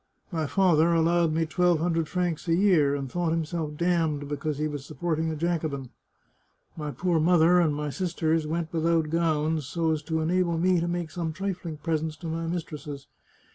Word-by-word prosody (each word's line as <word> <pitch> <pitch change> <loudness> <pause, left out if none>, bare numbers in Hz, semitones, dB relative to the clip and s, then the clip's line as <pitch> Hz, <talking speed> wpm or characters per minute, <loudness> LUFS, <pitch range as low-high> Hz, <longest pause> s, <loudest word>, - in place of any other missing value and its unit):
My 160 -3 -1
father 170 -2 +3
allowed 165 0 +3
me 160 +1 +1
twelve 175 +1 +2
hundred 165 0 0
francs 180 -3 -2
a 165 - +3
year, 170 -7 +4
and 140 -1 -3
thought 175 +5 -1
himself 160 -2 -2
damned 160 -4 0
because 145 0 -3
he 155 +1 0
was 145 -2 -5
supporting 160 +2 -2
a 160 - -2
Jacobin. 155 -5 -2 0.8
My 150 -2 -4
poor 165 +5 0
mother 175 +1 +5
and 155 -4 +2
my 150 0 -3
sisters 165 -2 0
went 165 +1 -3
without 165 -1 +1
gowns 160 -3 0
so 165 +2 0
as 155 -1 -1
to 160 -1 -1
enable 170 +1 +1
me 180 +1 +3
to 170 - -1
make 175 -2 -3
some 165 -2 -3
trifling 180 -3 -4
presents 160 0 -2
to 165 - -7
my 165 +1 -3
mistresses. 150 -4 -5
165 Hz, 180 wpm, -27 LUFS, 155-170 Hz, 0.8 s, mother